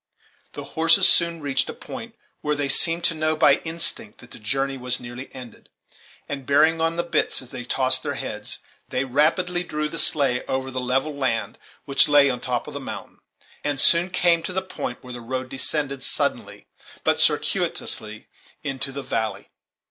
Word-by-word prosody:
The - - -6
horses 165 0 +4
soon 170 -1 +3
reached 135 -2 0
a - - -6
point - - -9 0.3
where 150 0 0
they 145 -1 -1
seemed 165 +4 +3
to 170 - +2
know 155 0 0
by 155 - +5
instinct 160 -10 -2
that 120 - -15
the - - -10
journey 135 +5 -1
was 125 -1 -2
nearly 120 +1 -8
ended, 125 -4 -12 0.6
and, 140 -1 -5
bearing 155 +3 +4
on 165 0 +1
the 170 - 0
bits 170 - +2
as 130 - -8
they 125 - -6
tossed 130 +1 +2
their - - -3
heads, - - -5 0.3
they 130 +1 -1
rapidly 165 +7 +2
drew 150 -3 -2
the 165 +1 -2
sleigh 135 -5 +3
over 130 0 -2
the 130 0 -3
level 135 +4 0
land 130 -5 -2 0.3
which 140 - +4
lay 145 -2 +6
on 125 - -4
the - - -7
top 125 -1 -1
of - - -9
the - - -4
mountain, - - -8 0.4
and 145 -2 -1
soon 170 +5 +5
came 175 -2 +3
to 185 - -4
the 190 +1 -1
point 125 -9 -6
where 125 -1 -9
the 120 - -7
road 130 +2 -4
descended 140 0 -1
suddenly, - - -1 0.4
but - - +2
circuitously, 110 0 0 0.4
into 135 -2 -3
the 140 0 -6
valley. 110 -4 -3
140 Hz, 185 wpm, -24 LUFS, 130-160 Hz, 0.6 s, lay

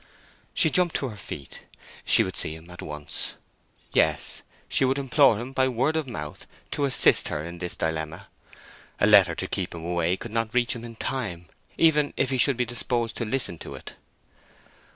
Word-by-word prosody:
She - - +3
jumped 180 -3 +2
to 135 - -1
her 110 - -9
feet. 75 -8 -9 0.4
She - - +5
would - - -5
see 80 - -1
him 80 +2 -13
at 90 - -9
once. 75 -1 -4 0.6
Yes, - - +1 0.3
she - - +2
would 130 +1 +2
implore 135 -3 +4
him 125 +3 -6
by 130 0 +2
word 130 +5 0
of 160 -3 -1
mouth 75 -11 -7 0.2
to 145 - 0
assist 135 - +5
her 75 - -3
in 85 0 -8
this 90 0 +1
dilemma. 80 -1 -3 0.7
A - - +4
letter - - +6
to - - -4
keep - - -3
him 85 -1 -7
away 85 +1 0
could 115 +3 -8
not 115 0 -2
reach 120 -2 +3
him 115 - -8
in 115 -1 -9
time, 105 -9 -3 0.3
even 150 -3 +3
if 130 - +1
he 130 - 0
should 135 -1 +3
be 125 - +1
disposed 120 -1 -1
to 120 - -2
listen 110 -8 +1
to - - -8
it. - - -9
115 Hz, 195 wpm, -26 LUFS, 85-135 Hz, 0.7 s, letter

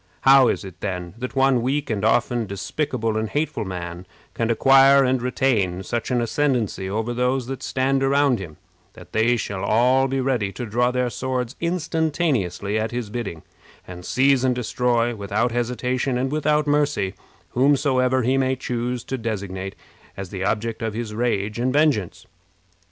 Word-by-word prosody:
How 135 -1 +7
is - - -1
it, 90 -2 -11
then, 90 -3 -4
that 125 +2 -5
one 135 -2 +3
weak 135 +2 -1
and 105 -2 -2
often 120 0 +1
despicable 110 +3 -2
and 110 0 -2
hateful 150 -7 -2
man 90 -1 -6 0.3
can 115 -1 -1
acquire 135 +3 +6
and 130 -1 +1
retain 110 -8 0
such 120 +3 -3
an 125 -1 +1
ascendency 120 -6 -1
over 110 +4 -2
those 125 +1 0
that 135 0 -6
stand 135 +1 0
around 135 -2 +3
him, 80 -6 -9 0.4
that - - -14
they 115 +2 +3
shall 100 -3 -4
all 125 +6 +3
be 135 0 -1
ready 125 -7 0
to 120 - -5
draw 120 +3 +1
their 125 -1 -1
swords 130 -1 -3
instantaneously 155 - -1
at 110 +1 -1
his 120 -4 -5
bidding, 105 -9 -5 0.4
and 90 -1 -9
seize 130 +5 +2
and 130 -1 +2
destroy, 120 0 0
without 105 +3 -1
hesitation 125 +2 -1
and 130 +2 -1
without 150 0 +1
mercy, 145 -10 +1 0.4
whomsoever 130 -1 +2
he 130 +3 +2
may 130 0 +1
choose 125 -1 -3
to 130 - -4
designate 95 -4 -4 0.4
as 95 -2 -6
the 95 -1 -4
object 110 +3 -1
of 110 -2 -3
his 115 -2 -4
rage 110 -2 -1
and 125 +2 +1
vengeance? 145 - +1
120 Hz, 165 wpm, -22 LUFS, 105-135 Hz, 0.4 s, How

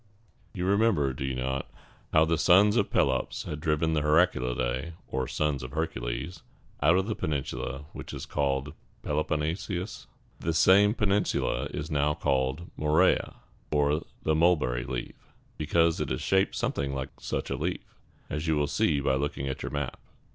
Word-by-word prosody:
You 90 - -2
remember, 95 - +2
do 65 - -5
you 65 -1 -2
not, 65 +1 -2 0.4
how 80 0 +5
the 80 -1 0
sons 95 +5 +6
of - - +2
Pelops 65 -2 0
had 75 - -5
driven 80 +1 +1
the 75 - +1
Heraclidæ, 70 -3 +1
or 65 -1 -2
sons 75 -3 -1
of 65 +1 -7
Hercules, 80 +1 -3 0.4
out 80 +5 +5
of 95 - +1
the 110 - -1
peninsula 70 -3 -3
which - - -8
was - - -6
called 70 -2 0
the - - -11 0.3
Peloponnesus? 80 +5 -2 0.3
This 80 0 0
same 100 +5 +6
peninsula 105 -2 +1
is 75 +2 -5
now 75 0 +2
called 70 +4 -1
Mo 75 - -3
re´a, 80 +5 +3 0.3
or 75 +1 +2 0.2
the 80 - +2
mulberry 75 -7 +2
leaf, 60 -1 -5 0.4
because 80 +2 +2
it 75 - -2
is 65 - -1
shaped 95 0 +2
something 70 0 -1
like 65 0 -3
such - - -3
a - - 0
leaf, 80 +7 -2 0.4
as 75 +3 -3
you 80 - +3
will 75 -1 +2
see 70 0 +1
by 70 - +1
looking 70 0 -2
at 65 - -4
your - - -3
map. 70 -3 -4
75 Hz, 170 wpm, -28 LUFS, 70-85 Hz, 0.4 s, sons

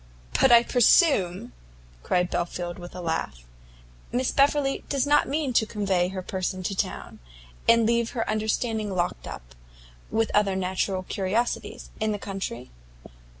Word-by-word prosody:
"But 265 - +5
I 235 0 +8
presume," 200 - +3 0.5
cried 180 - 0
Belfield, 175 0 -3
with 175 0 -10
a 180 - -6
laugh, 70 - -3 0.7
"Miss 250 +1 0
Beverley 280 0 +2
does 275 -2 +1
not 295 +1 +3
mean 285 -2 -1
to 220 -1 +3
convey 195 -4 0
her 185 0 -5
person 185 0 -3
to 195 - -2
town, - - -4 0.5
and 230 -1 +6
leave 235 0 +1
her 225 - -1
understanding 215 -1 -1
locked 175 - -2
up, - - -9 0.6
with 225 0 0
other 205 -2 +2
natural 185 0 -1
curiosities, 205 +6 -2
in 215 0 0
the - - -2
country? 190 - -6
200 Hz, 145 wpm, -26 LUFS, 180-235 Hz, 0.7 s, I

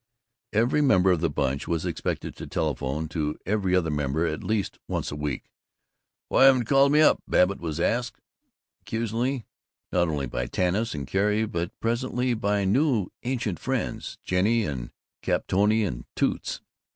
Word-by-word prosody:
Every 120 +7 +2
member 95 -10 +4
of 85 -3 +1
the 85 - +2
Bunch 70 -1 -1
was 85 -2 -1
expected - - -3
to - - -7
telephone 75 +5 -2
to 75 -1 -2
every 95 -2 +1
other 85 -4 +1
member 75 +2 0
at 75 -2 -3
least 105 -3 -1
once - - -2
a - - -4
week. 75 -1 -3 0.8
"Why - - +5
haven't 135 -2 +6
you - - -4
called 135 +3 +4
me 150 +1 +5
up?" 155 - +5
Babbitt 95 +2 +3
was 80 -2 -4
asked 120 +7 0 0.6
accusingly, 115 +3 -2 0.5
not 90 -1 +2
only 75 -4 -1
by 60 0 -3
Tanis 95 - 0
and 70 -2 -4
Carrie 105 +6 +1
but 85 -4 -4
presently 125 +2 0
by 100 -2 0
new 120 - +2
ancient 120 - -2
friends, - - -3
Jennie 105 +5 +2
and 65 -5 -4 0.3
Capitolina 105 +2 +2
and - - -6
Toots. - - -1
95 Hz, 160 wpm, -26 LUFS, 80-115 Hz, 0.8 s, haven't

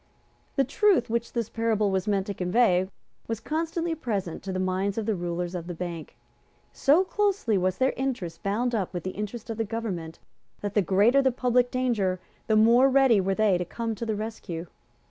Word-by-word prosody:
The 275 - +3
truth 325 - +2
which 235 0 -2
this 235 -3 -1
parable 220 -3 0
was 190 +2 -1
meant 200 -2 +1
to 200 - -3
convey 185 0 +2 0.4
was 225 -1 -3
constantly 330 +5 -2
present 210 - -3
to 195 - -5
the 185 - -2
minds 185 +2 -1
of 225 - -1
the 220 - +1
rulers 175 -1 -3
of 175 -2 -5
the 175 - -5
Bank. 170 -2 -6 0.6
So 300 +7 +4
closely 395 - 0
was 185 -1 +1
their 265 0 +2
interest 240 -12 -3
bound 235 +5 0
up 195 -5 -2
with 175 - -3
the 185 - -3
interest 210 +3 -5
of 225 - -5
the 225 - 0
government 200 -7 -4 0.4
that 205 -1 -3
the 210 - +3
greater 205 +9 +4
the 265 -1 +3
public 245 0 +2
danger 225 -8 0 0.3
the 220 - +3
more 235 +5 +6
ready 265 -6 +5
were 190 +1 0
they 205 -4 +3
to - - 0
come 230 +5 -3
to 225 +2 -5
the 220 - 0
rescue. 205 -6 -5
215 Hz, 200 wpm, -26 LUFS, 185-245 Hz, 0.6 s, more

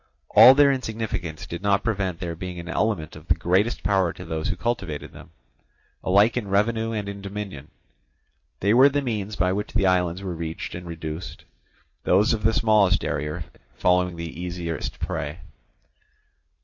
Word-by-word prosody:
All 130 - +9
their 145 0 +6
insignificance 110 - -4
did 85 - -6
not 100 0 +2
prevent 95 -6 -1
their 85 -1 -4
being 90 0 -6
an 85 - -8
element 95 -4 -1
of - - -13
the - - +3
greatest 95 +7 +1
power 95 -4 +2
to 90 - -10
those 80 +1 -3
who 90 - -1
cultivated 95 -7 -3
them, - - -13 0.7
alike 100 +5 +4
in 120 -5 -2
revenue 110 +3 +1
and 105 -3 -3
in 100 0 -6
dominion. 100 -8 -6 0.9
They 100 +2 +3
were 130 +4 +7
the 145 0 -1
means 110 -4 -3
by 90 -1 +1
which 105 +2 -4
the 95 - +2
islands 90 0 +1
were 95 -2 -3
reached 80 -1 -5
and 90 0 -7
reduced, 80 0 -7 0.6
those 100 +4 +3
of 110 - -2
the 110 +1 +3
smallest 105 -5 +3
area 75 +3 -3 0.3
falling 90 +3 +2
the 85 0 -7
easiest 85 -3 -4
prey. 75 +5 -4
95 Hz, 165 wpm, -24 LUFS, 85-105 Hz, 0.9 s, All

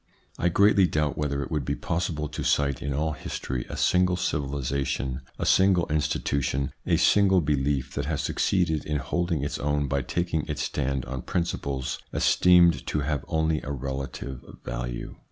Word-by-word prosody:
I 90 - +2
greatly 100 +1 +5
doubt 75 -2 0
whether 70 -1 -1
it 65 - -8
would 75 -3 0
be - - -1
possible 80 -3 -2
to 75 - -5
cite 70 -3 +1
in 70 - -3
all 75 +3 0
history 65 -4 -4
a - - -5
single 90 0 +3
civilisation, 70 -3 -2 0.2
a - - -2
single 95 -2 +4
institution, 70 -3 0 0.2
a - - +3
single 95 -2 +5
belief 70 -3 0
that 70 - -2
has 75 0 -1
succeeded 85 -6 +1
in 75 -1 -1
holding 80 +2 -1
its 70 - -3
own 75 0 0
by 70 0 0
taking 85 +3 -2
its 75 -1 -2
stand 65 -1 -1
on 65 0 -5
principles 70 -6 -2
esteemed 85 -5 +4
to 75 - 0
have 70 -2 -1
only 80 -1 +1
a - - -7
relative 65 -1 -5 0.2
value. - - -5
75 Hz, 165 wpm, -26 LUFS, 70-85 Hz, 0.2 s, greatly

